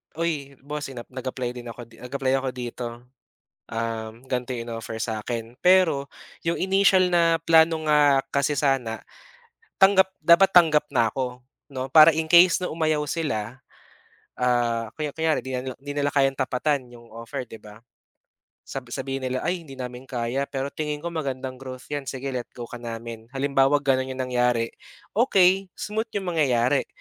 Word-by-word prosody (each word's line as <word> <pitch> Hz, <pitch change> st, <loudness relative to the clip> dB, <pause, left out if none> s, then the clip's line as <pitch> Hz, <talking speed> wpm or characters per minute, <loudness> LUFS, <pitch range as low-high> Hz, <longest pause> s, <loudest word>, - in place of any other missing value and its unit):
uy, 150 Hz, -4 st, -3 dB
boss 145 Hz, 0 st, -5 dB
inap 120 Hz, -2 st, -8 dB
nag-apply 130 Hz, -1 st, -4 dB
din 120 Hz, -1 st, -8 dB
ako 120 Hz, 0 st, -10 dB
nag-apply 130 Hz, +3 st, -3 dB
ako 130 Hz, 0 st, -2 dB
dito. 120 Hz, 0 st, -5 dB, 0.8 s
Um, 115 Hz, +1 st, -4 dB
gan'to 125 Hz, 0 st, -2 dB
eh 115 Hz, -, -4 dB
'no 115 Hz, -1 st, -5 dB
in-offer 110 Hz, -, -6 dB
sa'kin 115 Hz, +1 st, -4 dB
pero 180 Hz, -7 st, +4 dB, 0.4 s
'yong 170 Hz, -, +1 dB
initial 190 Hz, -1 st, +4 dB
na 165 Hz, -1 st, +4 dB
plano 160 Hz, -1 st, +4 dB
nga 145 Hz, -2 st, +5 dB
kasi 140 Hz, +1 st, +1 dB
sana 130 Hz, -5 st, 0 dB, 0.8 s
tanggap 190 Hz, -1 st, +6 dB, 0.2 s
dapat 175 Hz, +3 st, +6 dB
tanggap 155 Hz, -4 st, +6 dB
na 115 Hz, -3 st, +3 dB
ako 125 Hz, -1 st, -4 dB, 0.3 s
'no 130 Hz, 0 st, -4 dB
para 155 Hz, +1 st, +8 dB
in 160 Hz, 0 st, 0 dB
case 175 Hz, +1 st, +7 dB
na -, -, -1 dB
umayaw 155 Hz, -2 st, 0 dB
sila, 125 Hz, -8 st, -3 dB, 0.8 s
ah, 120 Hz, -2 st, +1 dB
kaya 150 Hz, -2 st, -2 dB
kunyari 160 Hz, -2 st, +1 dB
'di 130 Hz, 0 st, -3 dB
'di 145 Hz, +1 st, -7 dB
nila 145 Hz, 0 st, 0 dB
kayang 135 Hz, -1 st, +3 dB
tapatan 130 Hz, 0 st, 0 dB
'yong 120 Hz, -1 st, -15 dB
offer 115 Hz, +2 st, -6 dB
'di 110 Hz, -2 st, -12 dB
ba. 105 Hz, 0 st, -13 dB, 0.9 s
Sab 135 Hz, -3 st, -7 dB
sabihin 135 Hz, 0 st, -4 dB
nila 130 Hz, 0 st, -2 dB
ay 175 Hz, -1 st, -1 dB
hindi 135 Hz, -, -11 dB
namin 125 Hz, 0 st, -7 dB
kaya 125 Hz, +2 st, -2 dB
pero 135 Hz, 0 st, -3 dB
tingin 150 Hz, -1 st, -4 dB
ko 170 Hz, -, -2 dB
magandang 130 Hz, -4 st, -4 dB
growth 130 Hz, -1 st, -9 dB
'yan 145 Hz, -2 st, -3 dB
sige 135 Hz, +1 st, -4 dB
let 125 Hz, -2 st, -4 dB
go 120 Hz, -, -6 dB
ka 120 Hz, -, -7 dB
namin 115 Hz, -1 st, -7 dB
halimbaw 135 Hz, 0 st, +3 dB, 0.2 s
ganun 130 Hz, -1 st, +2 dB
yung 130 Hz, 0 st, -4 dB
nangyari 125 Hz, -2 st, +1 dB, 0.4 s
okey 195 Hz, -4 st, +4 dB
smooth 215 Hz, +2 st, -3 dB
yung 190 Hz, -3 st, -2 dB
mangyayari 135 Hz, -4 st, +2 dB
135 Hz, 160 wpm, -24 LUFS, 125-155 Hz, 0.9 s, para